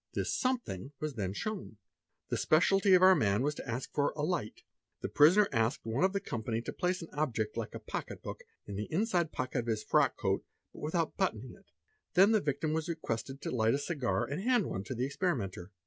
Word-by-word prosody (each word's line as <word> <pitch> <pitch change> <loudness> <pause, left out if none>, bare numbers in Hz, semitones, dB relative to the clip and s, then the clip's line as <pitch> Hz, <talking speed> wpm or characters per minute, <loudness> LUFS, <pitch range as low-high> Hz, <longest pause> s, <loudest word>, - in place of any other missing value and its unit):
This - - -1
"something" 235 - -2
was 155 -1 -3
then 100 -6 -2
shown. 205 - -5 0.5
The - - 0
speciality 190 +4 +4
of 180 - +5
our 190 0 +9
man 110 - +2
as 150 - +1
to - - -8
ask 120 +3 -4
for 145 - +1
"a 150 - -2
light." 155 -10 -2 0.4
The - - -3
prisoner 185 +8 +6
asked 115 +4 0
one 115 +5 0
of 190 - +4
the 200 - -1
company 115 - -3
to - - -5
place 180 -1 -1
an 165 - -10
object 115 -8 -1
like 115 -2 -4
a - - -5
pocket - - -6
book - - -6 0.2
in 100 -1 -6
the 105 - -4
inside 175 -2 +1
pocket 130 0 -2
of 120 - -4
his 110 -2 -1
frock - - +3
coat - - 0 0.3
out - - -11
without 160 +1 -1
buttoning 130 - -1
it; - - -20 0.5
then 195 +4 +7
the 215 -2 +4
victim 145 +2 -1
was 160 +1 -1
requested 135 -4 -4
to - - -2
light 115 0 +2
a - - +1
cigar 140 -5 -1
1 140 +6 -3
hand 240 -1 +2
one 95 - -3
to 130 - -4
the 125 +2 0
experimenter. 125 - -2
145 Hz, 220 wpm, -32 LUFS, 115-180 Hz, 0.5 s, our